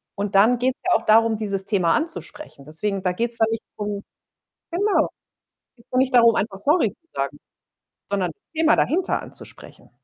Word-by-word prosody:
Und 200 0 -3
dann 215 +5 +5
geht‘s 255 +2 -1
ja 360 - +3
auch - - -16
darum, 225 0 +4
dieses 200 -3 -2
Thema 185 -6 +2
anzusprechen. 305 - -5
Deswegen, 195 +5 -3
da 180 - +1
geht‘s 230 +5 -1
dann 225 - +3
nicht 225 - -3
drum 205 -1 -4 0.7
genau, 400 +4 +2 0.7
geht 235 - -22
dann 255 - 0
nicht 260 0 +2
darum, 235 -2 +6
einfach 195 -1 -1
„Sorry“ 235 - +2
zu 330 - -44
sagen, 140 +1 -2 0.7
sondern 190 -3 0
das - - -44
Thema 320 -1 +4
dahinter 355 +4 +1
anzusprechen. - - -10
220 Hz, 175 wpm, -23 LUFS, 195-255 Hz, 0.7 s, darum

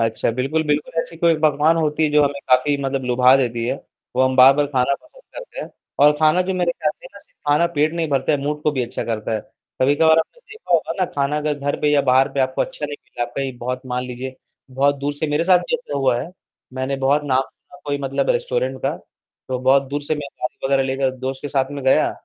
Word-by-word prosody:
अच्छा, 115 0 0
बिल्कुल, 135 +7 -1
बिल्कुल, 150 0 -1
ऐसी 165 - -8
कोई 170 0 +3
पकवान 155 +1 +3
होती 155 -1 +1
जो 150 0 +4
हमें 140 0 -2
काफ़ी 130 +3 +3
मतलब 135 0 -2
लुभा 125 +1 +5
देती 120 -3 -1
है, 125 - 0 0.4
वो 130 - +4
हम 130 0 +1
बार-बार 135 +3 +6
खाना 135 -1 +1
पसंद 410 - -17
करते - - -8
हैं। - - -6 0.3
और 145 +1 +7
खाना 155 +3 +4
जो 190 +1 -2
मेरे 175 -2 +1
ख़्याल 155 -2 -1
से - - -11
ना 200 - -12
सि - - -25
खाना 150 +4 +3
पेट 150 +1 +2
नहीं 165 -2 -1
भरता 140 +1 +1
है, 145 - +1
मूड 150 +1 -3
को 155 - +2
भी 130 -3 -1
अच्छा 120 - -4
करता 110 -1 -3
है। 110 - -2 0.4
कभी-कभार 160 +4 +4
आपने 165 - -3
देखा 440 -1 -7
होगा - - +2
ना 185 - +3
खाना 140 +1 0
अगर 150 0 -1
घर 145 0 -1
पे 150 - +2
या 145 - +4
बाहर 130 0 +4
पे 140 - -1
आपको 130 0 +1
अच्छा 150 - -5
नहीं 145 0 -6
मिला, 120 - -4
कहीं 135 +1 -5
बहुत 125 +1 -4
मान 125 0 -2
लीजिए 130 +1 -7 0.3
बहुत 140 +2 +2
दूर 140 +1 -2
से 145 +2 -3
मेरे 150 +2 0
साथ 180 -1 +5
भी 175 - -3
ऐसा 240 - -4
हुआ 130 -3 +2
है, 150 +7 -7 0.4
मैंने 130 +1 -2
बहुत 135 +2 +2
नाम 130 -2 +2
सुना 180 +6 -18
कोई 145 -1 -2
मतलब 135 - -1
रेस्टोरेंट - - -1
का, - - -1 0.5
तो 130 -1 -2
बहुत 130 +2 +4
दूर 145 +2 -2
से 150 +2 -1
मैं 145 -2 -6
गाड़ी 125 - -3
वगैरह 135 0 +2
लेकर 135 0 0
दोस्त 130 +1 -5
के 145 - -4
साथ 135 -1 0
में 145 -1 -6
गया, 130 - +4
140 Hz, 245 wpm, -21 LUFS, 130-155 Hz, 0.5 s, और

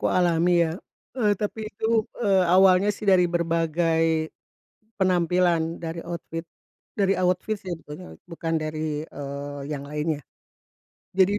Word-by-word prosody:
kualami 175 -1 +3
ya, - - -3 0.4
eee, 220 -5 +2
tapi 215 +1 -4
itu, 210 - -3 0.3
eee, 195 -5 +3
awalnya 190 +2 +6
sih 210 +1 -6
dari 185 -2 +6
berbagai 165 -1 +1 0.7
penampilan, 175 -2 +2
dari 165 0 -4
outfit 165 -1 -6 0.5
dari 195 -1 +3
outfit 185 +4 +1
sih 185 - -5
pokoknya, 150 - -10
bukan 165 -1 -3
dari, 155 -1 -3
eee, 140 0 -6
yang 140 -1 -5
lainnya. 150 +1 -2 1.0
Jadi 195 +2 +3
170 Hz, 120 wpm, -25 LUFS, 160-185 Hz, 1.0 s, awalnya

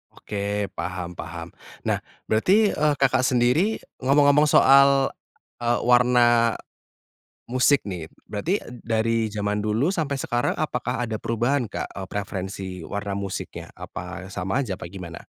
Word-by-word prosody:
Oke, 100 -1 -3
paham 90 -1 -4
paham. 85 -1 -6 0.4
Nah, - - +1 0.3
berarti, 195 - +4
eee, 150 0 +2
Kakak, 130 -2 +2
sendiri 130 - +3 0.2
ngomong-ngomong 145 +2 +4
soal, 140 -1 +6 0.5
eee, 120 0 +1
warna 120 -1 +4 0.9
musik 130 +3 +3
nih. 85 -4 -6 0.2
Berarti, 160 - -1 0.2
dari 115 0 +1
zaman 105 0 -1
dulu 110 +8 +1
sampai 145 -5 -1
sekarang, 120 -1 0
apakah 125 -4 -2
ada 110 -1 -3
perubahan, 120 +4 +1
Kak, - - -4
eee, 95 -1 -6
preferensi 95 -1 -4 0.2
warna 100 +1 -4
musiknya, 100 -1 -5
apa 95 - -8
sama 95 +9 -1
aja, 100 -8 -2
apa - - -9
gimana? 90 -3 -9
120 Hz, 130 wpm, -24 LUFS, 100-135 Hz, 0.9 s, soal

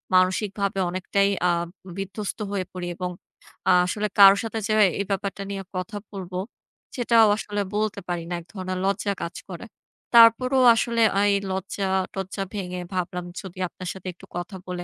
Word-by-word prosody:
মানসিকভাবে 195 +2 +1
অনেকটাই 195 +2 +1 0.2
আ - - +3 0.5
বিধ্বস্ত 195 +2 -5
হয়ে 195 -2 -1
পড়ি 180 -1 -5
এবং 180 0 -3 0.6
আ - - +7
আসলে 210 +3 -1
কারো 195 0 +10
সাথে 225 0 -3
যে 215 - +1 0.3
এই 200 - 0
ব্যাপারটা 195 0 -2
নিয়ে 195 -1 -4
কথা 185 +3 -4
বলব, 190 -3 -7 0.6
সেটাও 230 -3 +5
আসলে 205 -1 -3
বলতে 215 -1 0
পারি 175 -2 -2
না - - -3
এক 165 - -13
ধরনের 185 -1 -4
লজ্জা 200 +1 0
কাজ 170 - -5
করে। - - -7 0.5
তারপরেও 255 +3 +7
আসলে 230 0 0 0.2
এই 205 -1 +4 0.2
লজ্জাটজ্জা 190 0 -2
ভেঙে 180 -3 -4
ভাবলাম 180 -1 -3 0.2
যদি 190 -2 -10
আপনার 180 +1 -8
সাথে 190 -1 -10
একটু - - -15
কথা 175 +3 -5
বলে 180 -1 -4
195 Hz, 160 wpm, -24 LUFS, 185-210 Hz, 0.6 s, কারো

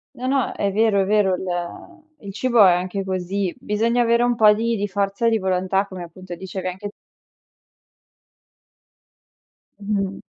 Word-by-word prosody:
No, 255 - -5
no. 270 -1 +1
È 200 -1 -1
vero, 215 -2 +3
è 190 - +1
vero. 200 -2 +2
Il 180 - -6 0.2
il 195 -1 -7
cibo 235 -1 +4
è 185 - +7
anche 185 +2 -2
così, 190 0 -2
bisogna 230 +4 0
avere 235 0 +2
un 245 0 +2
po' 215 -1 +6
di 230 +2 -1
di 205 -1 -2
forza 200 +3 -1
di 225 -1 +2
volontà 190 +1 0
come, 185 -2 -8
appunto, 175 +1 -9
dicevi 190 0 -6
anche 190 +3 -5 2.9
Mh-mh. 200 -1 -2
200 Hz, 150 wpm, -22 LUFS, 185-225 Hz, 2.9 s, è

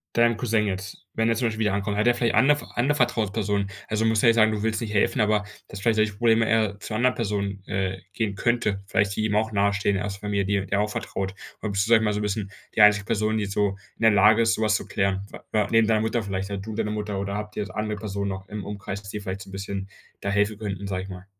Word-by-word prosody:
deinem 115 -1 +4
Cousin 110 -3 +1
jetzt, 95 +1 -5
wenn 115 0 +1
er 115 - +2
zum 120 +1 +1
Beispiel 110 0 -3
wieder 105 -2 +2
ankommt? 100 +1 -1
Hat 105 - +2
der 120 - +5
vielleicht 120 -1 +1
andere 145 +2 +4
andere 135 +5 +2
Vertrauenspersonen? 105 -5 0 0.2
Also, 110 +1 0
musst 110 -1 +3
ja 130 - +4
jetzt 115 - +6
nicht 115 - +5
sagen, 110 - +3
du 105 -1 -2
willst 110 0 0
nicht 110 -3 -4
helfen, 105 +5 +2
aber 105 0 +2 0.2
dass 100 - -8
vielleicht 115 +2 +2
solche 110 -1 +2
Probleme 115 +1 +3
er 110 -3 +1
zu 110 - -6
'ner 110 - 0
anderen 125 +1 +2
Person, 100 -3 -2
äh, 95 -1 -2
gehen 105 -4 -2
könnte. 110 -4 0
Vielleicht 100 0 +1
die 110 - 0
ihm 105 -1 0
auch 110 +1 +1
nahestehen, 100 0 +1
erste 100 0 -4
Familie 100 -1 -1
die 100 0 0
der - - -5
er - - +3
auch 105 - 0
vertraut. 95 -2 -3 0.3
Oder 105 - -1
bist 100 +2 0
du, - - -5
sag 115 - +8
ich 110 - -1
mal, 105 -1 +1
so 105 - -1
'n - - -3
bisschen 105 -1 -2 0.2
die - - +4
einzige 105 -1 +6
Person, 110 0 0
die 105 - 0
jetzt 100 - -5
so 105 0 +2 0.3
in - - -6
der 115 - +7
Lage 105 +3 +5
ist, 115 0 +3
so 110 - -2
was 105 -1 +3
zu - - -2
klären? 95 0 -1
Wa - - -11
wa 105 -2 +2
neben 115 -1 +4
deiner 110 -1 +3
Mutter 110 +1 0
vielleicht 95 -1 -3
halt 100 -1 -4
du 110 - -5
und 105 - -6
deine 105 -1 0
Mutter, 105 -2 -3
oder 100 0 -3
habt 105 0 -5
ihr 100 -3 -4
andere 105 0 -2
Personen 100 -1 -3
noch 95 +1 -6
im 105 -1 -5
Umkreis, 100 -1 -5
dass 100 - -10
die 105 - -4
da 105 - -7
vielleicht 95 -1 -4
so 95 - -10
'n - - -12
bisschen 95 0 -5 0.3
da - - -2
helfen 105 +1 +1
könnten, 100 -2 -4
sag 95 -1 -2
ich 95 - -8
mal? 90 0 -9
105 Hz, 295 wpm, -25 LUFS, 100-110 Hz, 0.3 s, sag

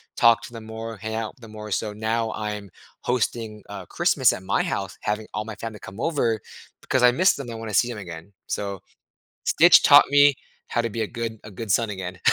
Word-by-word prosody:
talk 115 0 +5
to 120 - -10
them 115 -1 -9
more, 110 0 -6
hang 110 +2 -5
out 110 -1 -3
with 125 - -27
them 115 -2 -12
more, 105 -1 -8
so 105 +2 -1
now 110 +1 -1
I'm 105 -2 -5 0.3
hosting, 115 -3 -2
uh, - - -8
Christmas - - +3
at 95 - -6
my - - +1
house, 100 0 -3
having 105 +1 -2
all 105 - -2
my 110 - -7
family 110 -2 -7
come 100 +3 -11
over 120 -9 0 0.4
because 130 - 0
I 125 - +8
miss 185 +10 +4
them; 135 -4 -7
I - - -6
wanna 115 -2 -6
see 120 +5 +3
'em 115 - -6
again. 90 0 -9
So, 100 -2 -4 0.6
Stitch - - +7
taught - - +8
me 145 -1 +6 0.3
how 120 - 0
to 115 - -2
be 115 +1 -4
a 110 - -1
good 115 -2 -5
a 105 - -10
good 105 +1 -5
son 115 0 +2
again. 95 -2 -6
110 Hz, 225 wpm, -24 LUFS, 105-115 Hz, 0.6 s, I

